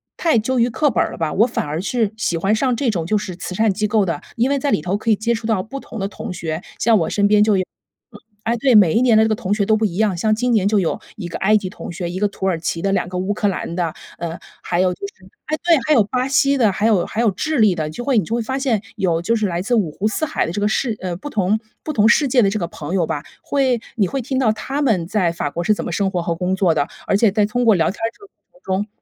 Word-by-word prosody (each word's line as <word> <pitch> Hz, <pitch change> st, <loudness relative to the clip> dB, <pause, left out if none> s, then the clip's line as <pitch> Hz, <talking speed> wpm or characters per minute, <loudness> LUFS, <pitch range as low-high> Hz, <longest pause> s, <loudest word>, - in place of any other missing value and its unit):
太 325 Hz, -8 st, +2 dB
究 245 Hz, +3 st, 0 dB
于 235 Hz, +1 st, +3 dB
课 290 Hz, +5 st, +1 dB
本 -, -, +2 dB
儿 -, -, -4 dB
了 -, -, -8 dB
吧， 160 Hz, -2 st, -2 dB
我 225 Hz, +5 st, +4 dB
反 240 Hz, -, -2 dB
而 155 Hz, +3 st, -3 dB
是 220 Hz, 0 st, -1 dB
喜 175 Hz, -6 st, -1 dB
欢 195 Hz, +6 st, +1 dB
上 255 Hz, +2 st, +1 dB
这 245 Hz, 0 st, 0 dB
种 175 Hz, -5 st, -2 dB
就 215 Hz, -, +2 dB
是 190 Hz, -4 st, -5 dB
慈 180 Hz, 0 st, -6 dB
善 220 Hz, 0 st, +2 dB
机 210 Hz, +2 st, -1 dB
构 210 Hz, -2 st, +2 dB
的。 165 Hz, -5 st, -3 dB
因 245 Hz, +4 st, +1 dB
为 280 Hz, -, +1 dB
在 285 Hz, -, -1 dB
里 -, -, +2 dB
头 185 Hz, +3 st, -1 dB
可 220 Hz, +2 st, -3 dB
以 215 Hz, -, +5 dB
接 230 Hz, +3 st, 0 dB
触 225 Hz, 0 st, -4 dB
到 210 Hz, -5 st, +1 dB
不 270 Hz, +7 st, -7 dB
同 230 Hz, -, -10 dB
的 195 Hz, -, -1 dB
同 200 Hz, -, -7 dB
学， 160 Hz, -1 st, -4 dB, 0.2 s
像 225 Hz, -3 st, +4 dB
我 165 Hz, -, -1 dB
身 205 Hz, -1 st, +2 dB
边 210 Hz, 0 st, +5 dB
就 210 Hz, -2 st, +3 dB
有 185 Hz, -, +1 dB
嗯， 215 Hz, +4 st, -21 dB, 0.3 s
哎， 230 Hz, +1 st, 0 dB
对， 255 Hz, +1 st, +3 dB
每 195 Hz, -7 st, +6 dB
一 230 Hz, -, +3 dB
年 240 Hz, -3 st, +5 dB
的 220 Hz, -, +6 dB
这 220 Hz, -, +1 dB
个 220 Hz, -, +2 dB
同 195 Hz, -1 st, -2 dB
学 205 Hz, -1 st, +1 dB
都 220 Hz, -, +3 dB
不 220 Hz, -, +1 dB
一 175 Hz, -4 st, -2 dB
样。 215 Hz, -4 st, +2 dB
像 215 Hz, +5 st, +2 dB
今 245 Hz, +2 st, 0 dB
年 210 Hz, -4 st, +3 dB
就 210 Hz, 0 st, +3 dB
有 175 Hz, -, -1 dB, 0.2 s
一 190 Hz, -5 st, -6 dB
个 170 Hz, -, -5 dB
埃 215 Hz, +2 st, +4 dB
及 200 Hz, -, -4 dB
同 165 Hz, -, -8 dB
学， 175 Hz, 0 st, -4 dB
一 185 Hz, -, -4 dB
个 205 Hz, -, +2 dB
土 195 Hz, -1 st, -6 dB
耳 175 Hz, -4 st, +1 dB
其 165 Hz, 0 st, -3 dB
的， 195 Hz, -, 0 dB
两 185 Hz, -2 st, 0 dB
个 180 Hz, -, -4 dB
乌 190 Hz, +3 st, -1 dB
克 205 Hz, 0 st, 0 dB
兰 185 Hz, -3 st, -3 dB
的， 170 Hz, -3 st, -1 dB, 0.3 s
呃， 170 Hz, 0 st, -5 dB, 0.2 s
还 175 Hz, -, -1 dB
有 185 Hz, -1 st, +2 dB
就 -, -, -16 dB
是 190 Hz, -1 st, -17 dB, 0.2 s
哎， 310 Hz, -, -1 dB
对， 340 Hz, -2 st, +5 dB
还 310 Hz, -, +4 dB
有 235 Hz, -7 st, +5 dB
巴 250 Hz, +5 st, -1 dB
西 280 Hz, 0 st, +3 dB
的， 220 Hz, -5 st, +3 dB
还 200 Hz, +3 st, -1 dB
有 195 Hz, -6 st, +3 dB
还 225 Hz, -, -2 dB
有 220 Hz, -4 st, +3 dB
智 310 Hz, +10 st, -2 dB
利 210 Hz, -4 st, +5 dB
的 155 Hz, -2 st, -2 dB
就 155 Hz, +10 st, -6 dB
会 270 Hz, -4 st, +2 dB
你 -, -, -1 dB
就 230 Hz, -, -2 dB
会 235 Hz, -, 0 dB
发 260 Hz, +4 st, -3 dB
现 240 Hz, -7 st, 0 dB, 0.2 s
有 175 Hz, -5 st, +1 dB
就 230 Hz, +6 st, +1 dB
是 215 Hz, -2 st, 0 dB
来 175 Hz, 0 st, -2 dB
自 240 Hz, +5 st, -1 dB
五 205 Hz, -8 st, +1 dB
湖 200 Hz, +7 st, -2 dB
四 220 Hz, +9 st, -1 dB
海 -, -, -1 dB
的 -, -, -4 dB
这 205 Hz, +4 st, -3 dB
个 205 Hz, -, +2 dB
世 220 Hz, +1 st, 0 dB
呃， 180 Hz, -2 st, -3 dB
不 290 Hz, -, -7 dB
同 210 Hz, -2 st, +1 dB, 0.2 s
不 310 Hz, -, -3 dB
同 220 Hz, -4 st, +4 dB
世 290 Hz, +4 st, +4 dB
界 250 Hz, -1 st, +3 dB
的 195 Hz, -, +3 dB
这 215 Hz, -, -2 dB
个 170 Hz, -, -2 dB
朋 160 Hz, 0 st, -7 dB
友 170 Hz, -4 st, +1 dB
吧， 150 Hz, -3 st, -3 dB, 0.2 s
会 260 Hz, -5 st, +1 dB
你 200 Hz, -5 st, +2 dB
会 270 Hz, +5 st, -3 dB
听 265 Hz, +2 st, -3 dB
到 235 Hz, -5 st, +3 dB
他 270 Hz, +6 st, -3 dB
们 195 Hz, -11 st, +1 dB
在 185 Hz, -4 st, +1 dB
法 155 Hz, -3 st, -3 dB
国 170 Hz, -, -3 dB
是 215 Hz, -, +3 dB
怎 -, -, -4 dB
么 -, -, -4 dB
生 195 Hz, -1 st, 0 dB
活 175 Hz, -, -1 dB
和 170 Hz, 0 st, -2 dB
工 180 Hz, +2 st, -1 dB
作 185 Hz, -4 st, +2 dB
的， 145 Hz, -1 st, +1 dB, 0.2 s
而 200 Hz, -, +3 dB
且 210 Hz, -1 st, +4 dB
在 205 Hz, 0 st, +2 dB
通 245 Hz, +2 st, -1 dB
过 225 Hz, -, +6 dB
聊 165 Hz, -3 st, +2 dB
天 195 Hz, -, -12 dB, 0.2 s
这 410 Hz, -, -21 dB
个 -, -, -13 dB
过 -, -, -29 dB, 0.2 s
程 205 Hz, -, 0 dB
中 -, -, -15 dB
210 Hz, 345 characters per minute, -20 LUFS, 180-235 Hz, 0.3 s, 每